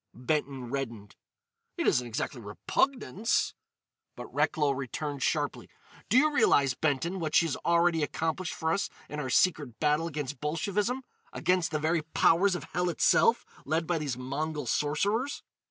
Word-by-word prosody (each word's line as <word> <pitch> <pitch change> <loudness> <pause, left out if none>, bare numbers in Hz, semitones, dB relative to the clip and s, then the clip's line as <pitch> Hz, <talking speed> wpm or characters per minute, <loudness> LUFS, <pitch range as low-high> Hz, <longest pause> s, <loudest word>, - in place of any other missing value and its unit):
Benton 130 -1 -2
reddened: 115 -7 -5 0.6
"It - - -1
isn't 125 0 +2
exactly 120 +2 -4
repugnance——" 210 - 0 0.6
But - - -9
Recklow 150 -3 +2
interrupted 140 +2 -4
sharply: - - -1 0.4
"Do 230 - +4
you 305 +3 +4
realise, 140 - +4
Benton, 160 +7 -1
what 155 -2 -2
she's 165 -4 +3
already 170 -1 +2
accomplished 160 +4 -2
for 160 0 0
us - - -1 0.2
in 150 - -6
our 135 -3 -3
secret 145 -5 +2
battle 150 +2 +2
against 145 -4 -5
Bolshevism?—against 185 - -1
the 155 - -1
very 160 +2 +1
powers 170 +4 +3
of - - -5
hell 180 0 +1
itself, 230 +6 +3 0.2
led 160 +3 0
by 170 0 0
these 140 -5 -3
Mongol 145 +3 -3
sorcerers? 200 - 0
155 Hz, 140 wpm, -29 LUFS, 140-175 Hz, 0.6 s, Do